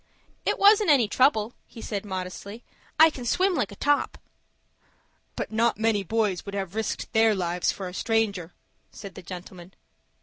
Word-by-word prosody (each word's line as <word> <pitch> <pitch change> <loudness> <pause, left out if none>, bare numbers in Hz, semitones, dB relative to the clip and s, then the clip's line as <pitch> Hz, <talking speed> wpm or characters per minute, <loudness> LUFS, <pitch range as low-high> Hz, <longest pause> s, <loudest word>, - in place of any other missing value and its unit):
"It - - +1
wasn't 410 0 +5
any 265 -7 +5
trouble," 225 -1 +2
he - - -13
said, 210 -2 -5
modestly. 190 +3 -6 0.4
"I 320 0 +8
can 255 - -8
swim 370 +10 +1
like 210 - -1
a - - -9
top." 290 +6 0 1.2
"But - - -4
not 230 +2 +1
many 220 -2 +1
boys 205 -1 -1
would 200 0 -7
have 190 -2 -4
risked 220 +2 -4
their 220 -1 +4
lives 175 -1 0
for 190 - -6
a 180 - -8
stranger," 200 -6 -1 0.4
said 200 -2 -10
the - - -10
gentleman. 180 0 -10
215 Hz, 165 wpm, -26 LUFS, 190-235 Hz, 1.2 s, I